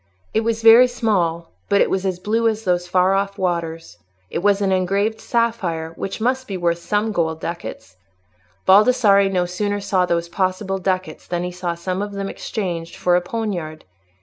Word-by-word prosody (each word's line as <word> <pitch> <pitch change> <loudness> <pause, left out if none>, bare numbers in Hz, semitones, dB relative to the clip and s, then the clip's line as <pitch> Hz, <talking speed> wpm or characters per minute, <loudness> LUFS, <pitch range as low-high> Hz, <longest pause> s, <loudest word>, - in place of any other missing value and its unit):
It - - +3
was 225 0 -2
very 230 +3 +8
small, 180 -9 -1 0.2
but 200 -1 +3
it - - +4
was 190 0 0
as 185 -2 -2
blue 225 +5 0
as 220 0 -1
those 180 -2 0
far 185 +1 +3
off 200 +1 -1
waters; 165 - -3 0.3
it - - -2
was 200 +2 +2
an 195 -2 +1
engraved 195 +4 0
sapphire, 195 -9 -1
which 195 +5 -5
must 255 +3 0
be 195 - -4
worth 170 -1 0
some 210 +4 -1
gold 160 -5 -1
ducats. 165 - -7 0.7
Baldassarre 200 -1 +5
no 180 -2 +1
sooner 205 +3 -2
saw 190 -2 +1
those 170 0 0
possible 190 +2 -1
ducats 185 -4 -3
than 175 0 -2
he 180 - -3
saw 175 -1 -3
some 185 +3 -3
of 205 0 -4
them 195 0 -4
exchanged 175 -6 -4
for 175 -1 +2
a 180 - +3
poniard. 175 -6 -4
190 Hz, 180 wpm, -21 LUFS, 175-210 Hz, 0.7 s, very